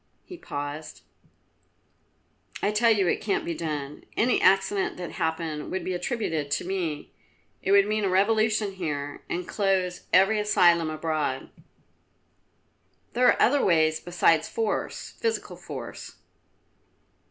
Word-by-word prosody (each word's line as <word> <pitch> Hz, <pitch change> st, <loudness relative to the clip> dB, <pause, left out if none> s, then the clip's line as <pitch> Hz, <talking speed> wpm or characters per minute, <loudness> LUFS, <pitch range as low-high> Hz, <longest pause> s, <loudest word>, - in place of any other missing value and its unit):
he 365 Hz, -, -9 dB
paused. 145 Hz, -, -6 dB, 1.6 s
"I 205 Hz, -, +2 dB
tell 230 Hz, +2 st, +3 dB
you 205 Hz, -5 st, +3 dB
it -, -, 0 dB
can't 200 Hz, -2 st, -1 dB
be 170 Hz, -, -2 dB
done. 150 Hz, -3 st, -5 dB
Any 245 Hz, +3 st, +2 dB
accident 195 Hz, +1 st, +2 dB
that 180 Hz, -1 st, -6 dB
happened 160 Hz, -3 st, -3 dB
would 190 Hz, -2 st, -3 dB
be 185 Hz, -, -2 dB
attributed 175 Hz, -, -2 dB
to 145 Hz, -, -1 dB
me. 175 Hz, -6 st, -3 dB, 0.5 s
It 195 Hz, -, -1 dB
would 200 Hz, 0 st, +6 dB
mean 215 Hz, 0 st, -1 dB
a 195 Hz, -, +1 dB
revolution 215 Hz, +2 st, +2 dB
here, 145 Hz, -6 st, -4 dB
and 180 Hz, 0 st, -3 dB
close 190 Hz, -3 st, -1 dB
every 195 Hz, +4 st, +5 dB
asylum 175 Hz, -6 st, +4 dB
abroad." 155 Hz, -4 st, -2 dB, 1.6 s
"There 250 Hz, +1 st, +4 dB
are -, -, +4 dB
other 280 Hz, +3 st, +4 dB
ways 160 Hz, -3 st, +3 dB
besides 165 Hz, -2 st, +2 dB
force, 225 Hz, -2 st, -3 dB
physical 455 Hz, -1 st, -2 dB
force." -, -, -8 dB
185 Hz, 130 wpm, -26 LUFS, 160-210 Hz, 1.6 s, would